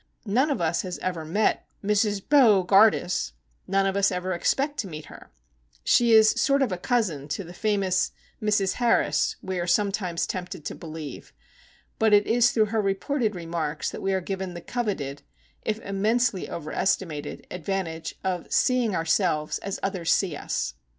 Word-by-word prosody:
None 250 +9 +2
of 280 - 0
us 170 0 +1
have 180 -2 -5
ever 180 -3 -2
met 190 +8 0 0.2
Mrs. 205 -1 +1
Bo 230 -10 +6
gardus, 195 - +3 0.3
none 195 0 +2
of 195 0 0
us 200 0 +3
ever 180 +1 -2
expect 275 - 0
to 205 - -2
meet 155 -3 -8
her,—she 60 - -2
is 220 -1 +7
a - - -12
sort 275 0 +3
of 185 -8 -2
cousin 190 - 0
to 150 +6 -3
the 175 0 -11
famous 195 -2 0 0.3
"Mrs. 210 -3 +2
Harris," 240 -1 +2
we 190 -1 -3
are 175 - -2
sometimes 190 -2 0
tempted 180 -4 -6
to - - -3
believe,—but 160 +7 -5
it 205 0 +4
is 240 +1 +4
through 220 -3 +2
her 220 - +2
reported 210 +3 -1
remarks 165 -3 -3
that - - -7
we 195 - 0
are 190 -1 0
given 190 -1 -4
the 175 - -6
coveted, 175 - -3 0.4
if 215 0 -2
immensely 210 +1 0
overestimated, 160 -1 -2
advantage 175 -3 -4
of 180 -2 -3
"seeing 245 -6 +2
ourselves 165 -2 +1
as 195 -1 -5
others 185 -4 -1
see 180 -6 +1
us." 105 - -3
190 Hz, 160 wpm, -26 LUFS, 170-215 Hz, 0.4 s, is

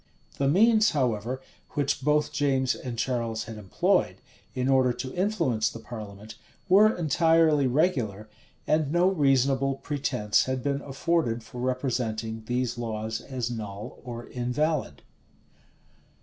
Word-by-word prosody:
The 140 - +2
means, 215 +7 +5
however, 125 0 -1 0.3
which 140 -2 0
both 150 +2 +2
James 135 -3 +1
and 120 -2 -6
Charles 115 -2 -1
had 110 -1 -8
employed, 95 -3 +1 0.4
in 125 0 0
order 130 -2 +3
to 130 +1 -6
influence 165 - +1
the - - -9
parliament, 110 -2 -9 0.3
were 205 +3 +6
entirely 160 -2 +3
regular, 120 - 0 0.4
and 155 -2 +1
no 175 +2 +3
reasonable 135 -5 +2
pretence 130 -7 0
had 130 -1 -2
been 140 0 -1
afforded 135 -4 -1
for 115 +2 -8
representing 120 -4 -2
these 125 -1 -1
laws 110 -1 -3
as 125 -3 -4
null 105 -3 -7
or 120 -1 -7
invalid. 130 +5 -2
130 Hz, 125 wpm, -27 LUFS, 115-145 Hz, 0.4 s, were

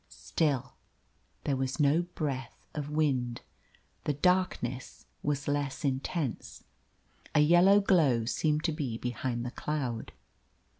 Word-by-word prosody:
Still 140 -5 -1 0.7
there 140 - +1
was 135 +3 -2
no 150 +3 +4
breath 145 -7 -5
of 150 -2 -4
wind. 135 -6 0 0.6
The 150 - +1
darkness 145 -6 0 0.2
was 145 -1 -1
less 145 -1 -1
intense. 135 0 -2 0.7
A - - +6
yellow 175 +6 +6
glow 150 - +3
seemed 150 +5 +1
to 165 - +1
be 140 -8 -3
behind 120 0 -3
the 125 - -3
cloud. 130 -6 -3
145 Hz, 115 wpm, -30 LUFS, 130-155 Hz, 0.7 s, A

